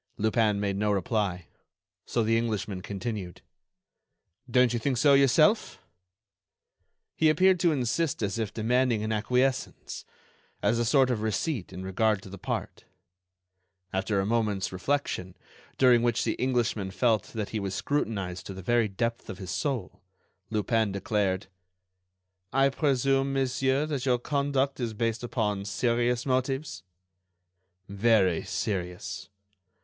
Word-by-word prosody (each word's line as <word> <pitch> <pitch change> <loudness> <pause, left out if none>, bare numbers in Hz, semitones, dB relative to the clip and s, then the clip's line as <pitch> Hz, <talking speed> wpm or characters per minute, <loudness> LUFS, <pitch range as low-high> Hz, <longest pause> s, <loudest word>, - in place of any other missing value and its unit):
Lupin 110 -1 +2
made 100 -1 -1
no 105 +1 +1
reply. 100 -3 -1 0.6
So 115 - +1
the 115 +1 +2
Englishman 110 -4 -2
continued: 100 -2 -5 1.1
"Don't 125 0 +4
you 120 - 0
think 130 +2 0
so 140 +3 +5
yourself?" 145 - +4 1.4
He 160 - +4
appeared 185 +4 +4
to 170 -1 +3
insist 135 0 0
as 100 +2 -1
if 110 -2 -2
demanding 115 0 +1
an 110 - -2
acquiescence, 125 - -1 0.6
as 110 +3 +2
a 120 - +1
sort 130 +2 +4
of 115 -4 -1
receipt 110 - -2
in 90 - -7
regard 100 +2 +1
to - - -10
the 100 - -9
part. - - -4 1.1
After 95 +2 0
a 95 - 0
moment's 105 -3 0
reflection, 95 -3 -2 0.4
during 125 -3 +5
which 120 -1 +1
the - - 0
Englishman 120 -6 0
felt 110 +1 +1
that 105 -2 -3
he 110 - -3
was 95 -2 -3
scrutinized 100 -10 -2
to 95 - -7
the 95 - -8
very 120 +2 +2
depth 115 +4 -3
of - - -6
his 95 -2 -6
soul, 130 - -3 0.5
Lupin 110 0 +1
declared: 100 -1 -1 1.1
"I 135 +1 +4
presume, 135 -1 +1
monsieur, 135 +1 +1
that 140 -4 -3
your 125 -1 +4
conduct 140 +1 0
is 115 -3 -3
based 115 +1 -1
upon 105 -5 -1
serious 120 +3 0
motives?" 130 - -1 1.1
"Very 100 -4 +3
serious." 90 -4 -4
115 Hz, 135 wpm, -28 LUFS, 100-130 Hz, 1.4 s, so